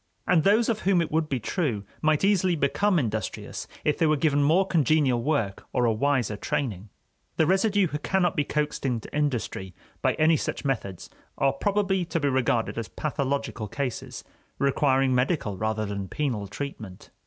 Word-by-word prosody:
And 165 -4 +3
those 215 +4 +4
of 225 -3 0
whom 190 -2 +2
it 165 - -1
would 155 0 0
be 130 - -1
true 120 - -2 0.2
might 155 0 +2
easily 185 -3 +3
become 180 +7 +1
industrious 110 - -3 0.2
if 150 - +1
they 165 - +4
were 155 0 +3
given 145 -1 +2
more 165 +7 +4
congenial 150 -7 +2
work 115 -8 -1
or 125 -1 +2
a 115 - +3
wiser 125 -2 +1
training. 105 -2 -3 0.5
The 160 - +4
residue 195 +3 +3
who 150 -3 -3
cannot 180 +1 +1
be 145 - +2
coaxed 150 +1 -2
into 125 -3 -3
industry 120 -10 -2 0.3
by - - +2
any 160 +1 +4
such - - -4
methods 105 -9 -3 0.3
are 135 -1 +2
probably 195 +3 0
to 170 0 -2
be 145 -2 +1
regarded 125 -3 0
as 115 - -4
pathological 140 -6 -3
cases, 130 +3 -4 0.3
requiring 135 -1 +2
medical 125 - 0
rather 110 +2 -1
than 100 -1 -4
penal 120 -5 -2
treatment. 105 -4 -7
140 Hz, 170 wpm, -26 LUFS, 115-160 Hz, 0.5 s, those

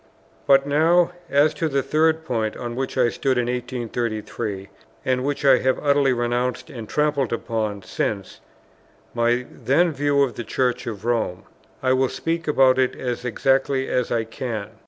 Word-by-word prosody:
But 135 0 +5
now, 165 +5 +3 0.2
as 145 +2 +4
to 160 +1 -1
the 140 -1 0
third 160 +1 +1
point 110 -5 -2
on 120 -1 -5
which 130 +1 -3
I 125 -2 +4
stood 130 +1 0
in 120 - +1
1833, 120 -4 -4 0.4
and 130 -1 +1
which 140 +1 -2
I 135 -2 +6
have 130 0 +1
utterly 140 -2 +2
renounced 120 +4 -1
and 115 -5 -8
trampled 150 -4 +1
upon 110 -4 -2
since, 100 0 -3 0.7
my 120 +1 +1
then 165 +6 +2
view 145 -1 +2
of 130 - -3
the 120 - -3
Church 125 +2 -1
of 110 -2 -6
Rome; 115 -7 -1 0.4
I 130 0 +3
will 130 0 +2
speak 165 0 -3
about 130 -3 +4
it 130 -1 +1
as 125 -1 -4
exactly 135 +2 +1
as 125 -1 0
I 115 -1 +1
can. 110 -2 -5
130 Hz, 165 wpm, -23 LUFS, 120-140 Hz, 0.7 s, I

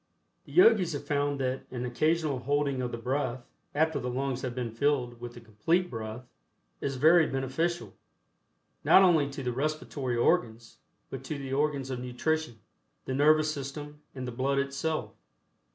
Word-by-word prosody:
The - - -14
Yogis 215 - +5
have 145 0 -5
found 145 -1 0
that 130 0 -2
an 125 -1 -4
occasional 155 +2 +1
holding 140 0 0
of 125 -1 -2
the - - -4
breath, 130 0 -2 0.3
after 160 -1 +2
the 125 - -3
lungs 130 0 -2
have 125 -2 -4
been 120 -3 -3
filled 125 -1 0
with 120 0 -7
the - - -9
Complete 120 - 0
Breath, 110 +1 -6 0.5
is 135 -1 -2
very 160 +4 +5
beneficial, 150 +6 -2 0.9
not 190 - +7
only 160 -6 +4
to 140 -1 -6
the 125 -1 -1
respiratory 140 -2 -2
organs 115 -1 0 0.3
but - - -6
to 155 - -4
the 135 -1 -5
organs 140 -2 0
of 125 - -3
nutrition, 125 +2 -2 0.5
the 130 - -3
nervous 155 +2 +4
system 145 +1 -7
and 130 -1 -5
the - - -4
blood 135 +3 0
itself. 140 +3 -2
135 Hz, 165 wpm, -29 LUFS, 125-150 Hz, 0.9 s, not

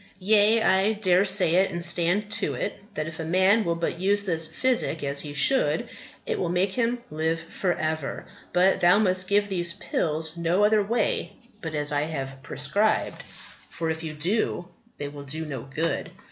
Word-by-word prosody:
Yea, 215 +3 +3
I 190 +2 +3
dare 195 -3 +3
say 185 -3 +3
it, 190 +1 +3
and 175 0 -1
stand 180 +4 +1
to - - -1
it, 205 - -3 0.2
that 155 - -2
if 160 +1 -8
a - - -3
man 190 +6 +3
will 170 -3 -1
but 170 0 -3
use 200 +2 +1
this 165 -4 +1
physic 165 - 0
as 140 0 -2
he 145 -1 -7
should, 265 - +3 0.4
it - - -2
will 175 - -1
make 185 +2 0
him 240 +1 0
live 160 +2 -1
for 175 +2 -2
ever. 155 -3 -3 0.3
But 180 +2 +3
thou 175 +3 +6
must 185 -3 +1
give 205 +1 +2
these 175 -3 -1
pills 160 0 -2
no 170 +4 +1
other 210 0 +4
way 225 +1 -1 0.3
but 160 -2 -5
as 150 0 +1
I 145 0 +1
have 135 -3 -5
prescribed; 200 +12 0 0.5
for, 165 -1 -3
if 160 0 -5
you 160 -2 -5
do, 175 +2 -1 0.3
they 145 - -4
will 145 0 -9
do 155 +4 -4
no 135 -5 -5
good." 165 +3 -2
175 Hz, 190 wpm, -25 LUFS, 160-200 Hz, 0.5 s, thou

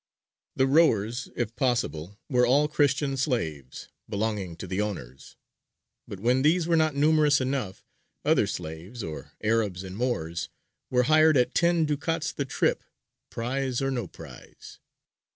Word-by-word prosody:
The 130 - +3
rowers, 120 -6 +2
if 115 -2 -3
possible, 105 - -1
were 125 -4 +2
all 140 +5 +4
Christian 145 -2 +1
slaves, 80 - -3 0.2
belonging 100 -4 -2
to - - -8
the 95 +2 -2
owners, 70 -11 -6 0.7
but 100 - -8
when 125 +5 +2
these 160 +4 +3
were 170 0 +2
not 155 -2 +2
numerous 150 0 +4
enough, 130 -7 -3 0.4
other - - +3
slaves, 85 +9 -6
or 80 -4 -7
Arabs 105 -4 0
and 95 0 -8
Moors, 85 -9 -2 0.4
were 125 -1 +3
hired 155 +1 +5
at 125 0 +2
ten 170 -2 +3
ducats 160 +2 -1
the 140 - -3
trip, 130 - 0 0.5
prize 130 +1 -2
or 135 0 -1
no 120 -7 -2
prize. - - -13
125 Hz, 140 wpm, -27 LUFS, 100-145 Hz, 0.7 s, hired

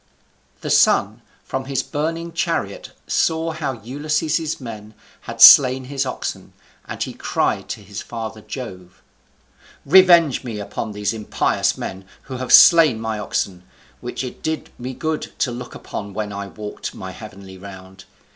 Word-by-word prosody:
The - - -3
Sun - - +3 0.2
from 130 0 -4
his 135 0 -1
burning 165 +3 -3
chariot - - -2 0.2
saw 165 0 0
how 155 -4 -3
Ulysses's 155 +4 -1
men 110 -4 -9 0.3
had 115 0 -7
slain 130 +2 +9
his 135 +1 -3
oxen, 130 - -5 0.3
and - - -4
he - - -6
cried - - -1
to - - -5
his 100 +1 -8
father 110 -2 -7
Jove, 90 -8 -9 0.8
"Revenge 170 -4 +6
me 115 -4 -5
upon 105 +1 -5
these 105 0 -2
impious 110 -2 0
men 95 0 -6 0.2
who 130 -2 -7
have 130 0 -4
slain 160 -9 +8
my 110 -1 -3
oxen, 95 -3 -3 0.4
which - - -5
it 125 - -8
did 160 0 -3
me 125 +1 -6
good 160 -1 -3
to 125 - 0
look 120 +1 -8
upon 100 -2 -7
when 105 -1 -3
I 100 0 -5
walked 105 +1 -7
my - - -7
heavenly 95 -1 -11
round. 95 -1 -12
125 Hz, 150 wpm, -21 LUFS, 105-150 Hz, 0.8 s, slain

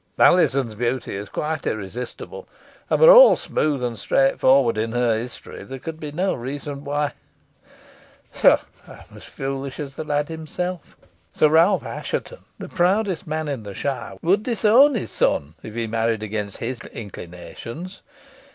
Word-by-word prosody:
Alizon's 135 -9 +4
beauty 120 +1 -2
is 100 0 -6
quite 155 +4 -3
irresistible, 110 +4 -6 0.4
and, - - +2
were 485 +1 +9
all - - +9
smooth 145 -4 -1
and 120 -3 -3
straightforward 135 0 +3
in 110 +1 -2
her 120 -2 +2
history, 115 +2 -7
there 135 - -8
could 160 +4 -7
be 150 -2 -6
no 185 +5 0
reason 140 +3 -6
why 145 0 -1 1.2
pshaw! - - +5 0.3
I - - -11
am - - -14
as - - -11
foolish 135 +1 -5
as 140 -2 -6
the - - -3
lad 145 -1 -1
himself. 165 +2 -5 0.4
Sir 155 - +4
Richard 165 +6 +4
Assheton, - - -5
the - - -7
proudest 185 0 0
man 155 0 -2
in 140 -5 -3
the 100 -2 -9
shire, 135 -3 -4
would 190 +5 +3
disown 235 +5 +4
his 220 - -3
son 70 +2 0
if 110 - -9
he 115 -1 -1
married 115 0 -1
against 105 -1 -4
his 120 0 -4
inclinations. 105 - -9
140 Hz, 155 wpm, -22 LUFS, 115-160 Hz, 1.2 s, were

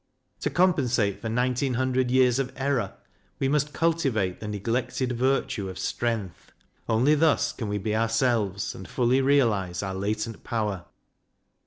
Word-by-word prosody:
To - - -1
compensate 125 - +2
for 115 - -3
nineteen 125 +2 0
hundred 130 0 +1
years 130 0 +4
of 130 -2 -1
error, 135 -7 -1 0.4
we 135 - 0
must 150 +1 +1
cultivate 135 - 0
the 105 - -6
neglected 115 +5 -2
virtue 125 -5 0
of 95 - -8
strength. 110 -7 -3 0.4
Only 120 +7 +4
thus 155 0 +3
can 115 - -5
we 105 0 -1
be 105 +2 -2
ourselves, 115 -3 0
and 95 - -9
fully 125 +1 +2
realize 110 -10 +2
our 95 -1 -3
latent 105 +3 -3
power. 105 -6 -2
120 Hz, 145 wpm, -26 LUFS, 105-130 Hz, 0.4 s, years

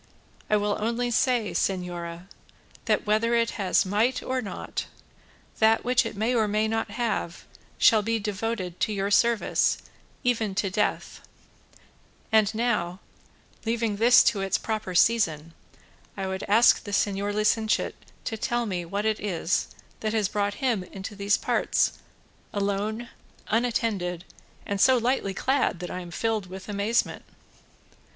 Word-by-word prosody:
I 215 - +4
will 205 0 0
only 235 +3 -1
say, 240 -3 +1
señora, 175 -2 -3 0.6
that - - +1
whether 220 +3 +2
it 230 0 +2
has 190 0 +3
might 215 +7 +1
or 255 0 -1
not, - - -5 0.7
that 220 0 +4
which 250 +1 +2
it - - -8
may 225 +4 +1
or 220 -3 +2
may 215 +1 +1
not 225 0 -1
have 215 -6 -3 0.3
shall 220 -3 +5
be 225 +2 0
devoted 205 -3 -3
to - - +1
your 200 0 -1
service 235 +1 +3 0.5
even 225 -5 0
to 195 -1 0
death; 210 - -1 1.1
and 220 -2 +4
now, 210 -6 0 0.6
leaving 225 -2 -1
this 235 +3 +7
to 205 -4 +1
its 195 -1 +1
proper 215 -5 -4
season, 165 -7 +2 0.6
I 195 - -2
would 190 0 -3
ask 225 +4 +5
the - - -8
señor 205 0 0
licentiate 215 +1 +1 0.3
to 225 - -3
tell 240 +1 -1
me 185 -5 -2
what 200 +5 -3
it 220 -1 +1
is 180 -3 -1 0.3
that 215 0 -2
has 215 -3 +1
brought 205 -1 -1
him 230 -7 +1
into 195 +3 -8
these 200 +1 +2
parts, - - 0 0.5
alone, 205 +3 -2 0.4
unattended, 215 -7 0 0.4
and 200 -1 -2
so 260 -1 +6
lightly 235 -5 0
clad 260 -6 +1
that 180 - -6
I 180 - -4
am 175 -1 -8
filled 215 +2 -1
with 190 +1 -9
amazement." 210 +3 0
210 Hz, 145 wpm, -26 LUFS, 195-230 Hz, 1.1 s, this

